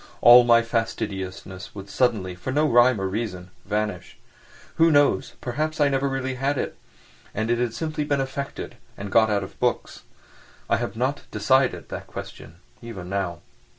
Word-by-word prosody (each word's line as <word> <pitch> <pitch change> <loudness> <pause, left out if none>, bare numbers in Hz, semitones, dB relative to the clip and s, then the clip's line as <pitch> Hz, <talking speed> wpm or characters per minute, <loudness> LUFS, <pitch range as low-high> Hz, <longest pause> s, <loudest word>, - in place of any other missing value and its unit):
All 120 +1 +9
my 115 -1 +5
fastidiousness 100 -5 -4
would 100 -1 -8
suddenly, 105 -6 0
for 90 +8 -5
no 150 +3 +2
rhyme 120 -2 +5
or 95 - -2
reason, 95 -3 -4
vanish. 105 +1 -3 0.6
Who 165 0 +6
knows, 145 -2 +3
perhaps 155 +5 -2
I 145 -1 +4
never 135 0 +1
had - - -3
really 130 0 -2
had 140 +2 0
it, - - -3 0.6
and 110 +2 -1
it 120 - +1
had 120 -2 -1
simply 155 +2 -2
been 145 -1 0
affected, 135 +1 -5 0.2
and 100 0 -6
got 110 +1 +5
out 100 -1 +1
of 95 - -11
books. - - -1 0.7
I - - +4
have - - -4
not 130 +5 -1
decided 130 -1 +1
that - - -6
question 80 - -9 0.3
even 100 -7 -8
now. 90 -3 -2
120 Hz, 170 wpm, -24 LUFS, 100-135 Hz, 0.7 s, All